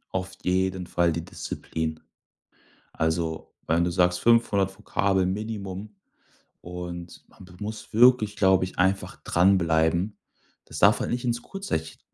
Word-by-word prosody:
Auf 95 0 -2
jeden 95 0 0
Fall 85 -1 +1
die 85 +1 -4
Disziplin. 80 -1 -5 0.9
Also 80 0 -2
wenn 85 +2 +2
du 85 - 0
sagst, 90 0 +2
500 105 -5 +3
Vokabel 100 -3 +1
Minimum 100 0 -4 0.7
und 85 0 -8
man 95 - -16
be 90 - -16
muss 105 +1 -7
wirklich, 115 -2 +5
glaube 95 -3 +4
ich, 95 - -10
einfach 95 +1 +1
dranbleiben. 85 +1 +2 0.5
Das - - -8
darf - - +5
halt - - -2
nicht 120 +1 -2
ins 120 -1 -1
Kurzzeich 80 - -4
95 Hz, 135 wpm, -26 LUFS, 85-105 Hz, 0.9 s, wirklich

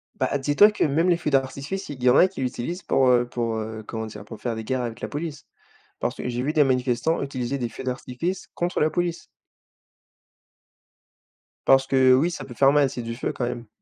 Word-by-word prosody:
Bah, 145 - 0
dis-toi 145 +10 +5
que 210 - -1
même 160 +5 +2
les 170 - +4
feux 160 - -2
d'artifice, 140 +7 -1
il 130 -4 -7
y 125 - +6
en 125 - +5
a 185 - +7
qui 185 -7 -8
l'utilisent 130 +8 -3
pour, 130 -1 +2
heu, 120 -1 +4
pour, 115 -2 -2
heu, 110 0 -5
comment 110 -1 -4
dire? 105 -1 -10
Pour 110 0 -10
faire 120 -2 -2
des 110 - -5
guerres 130 +2 -1
avec 115 -2 -5
la - - -3
police. 150 -1 -5 0.5
Parce - - -2
que - - -5
j'ai 120 +1 -2
vu 150 +3 -1
des 150 - +5
manifestants 125 +4 +1
utiliser 135 -1 -3
des 120 -3 -3
feux - - -9
d'artifice 130 +8 -4
contre 175 +1 -1
la 155 - +3
police. 175 +1 -2 2.4
Parce 135 0 +6
que, 130 -1 +5
oui, 160 +7 +3
ça 135 -4 -6
peut 125 - -10
faire 135 +3 +5
mal 145 -1 +4
et - - -1
c'est 125 -2 -5
du 115 0 -5
feu 120 - -3
quand 125 - -4
même. 120 -2 -5
130 Hz, 225 wpm, -24 LUFS, 120-150 Hz, 2.4 s, a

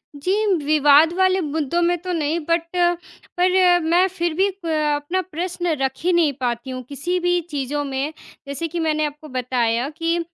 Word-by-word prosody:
जी, 380 +9 0
म - - +2
विवाद 300 +2 +5
वाले 375 0 +3
मुद्दों 310 +2 -1
में 350 +1 +2
तो 365 -1 -3
नहीं 320 +1 0
बट, 335 0 +2
पर 355 +1 +2
मैं 345 +4 +3
फिर 345 -3 -2
भी 385 +4 +2
प - - -4 0.3
अपना 340 +6 -2
प्रश्न 350 0 -2
रख 265 -1 +1
ही 360 0 +2
नहीं 320 -5 +3
पाती 240 0 -2
हूँ 255 0 -5
किसी 345 +6 -2
भी 355 0 +1
चीज़ों 290 +1 -2
में। 275 +3 -3 0.3
जैसे 280 +4 -3
कि 340 +2 -4
मैंने 310 -1 +1
आपको 295 +1 -7
बताया 245 +1 0
कि 335 +1 0
330 Hz, 180 wpm, -21 LUFS, 290-355 Hz, 0.3 s, विवाद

